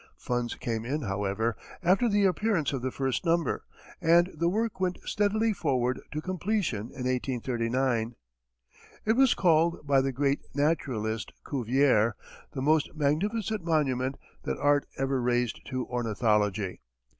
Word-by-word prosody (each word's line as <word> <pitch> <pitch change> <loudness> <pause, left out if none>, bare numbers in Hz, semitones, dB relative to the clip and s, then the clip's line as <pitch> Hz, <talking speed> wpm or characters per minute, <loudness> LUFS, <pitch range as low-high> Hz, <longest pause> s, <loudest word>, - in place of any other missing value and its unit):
Funds 120 -1 -2
came 115 -2 -3
in, 140 +5 -2
however, 105 +2 -1 0.3
after 190 +7 +3
the 205 -1 +3
appearance 190 - +1
of 135 - -2
the 130 - -1
first 130 0 -2
number, 170 -1 +1 0.4
and 170 +2 +4
the 170 +2 +1
work 220 +2 -1
went 185 -1 0
steadily 215 +2 +1
forward 130 -8 0
to 150 - -3
completion 185 - -1
in 125 - -6
1839. 125 -1 -1 0.9
It 220 - +4
was 260 0 +4
called 170 -2 +2
by 140 -2 +4
the 135 0 0
great 140 +2 +1 0.2
naturalist, 125 -8 -1
Cuvier, 125 -4 +2 0.4
"the 130 - -3
most 155 +2 +2
magnificent 200 +8 0
monument 135 -5 0 0.2
that - - -3
art 145 0 +2
ever 135 -1 0
raised 120 -1 0
to 130 -2 -3
ornithology." 105 -5 0
135 Hz, 135 wpm, -28 LUFS, 120-170 Hz, 0.9 s, and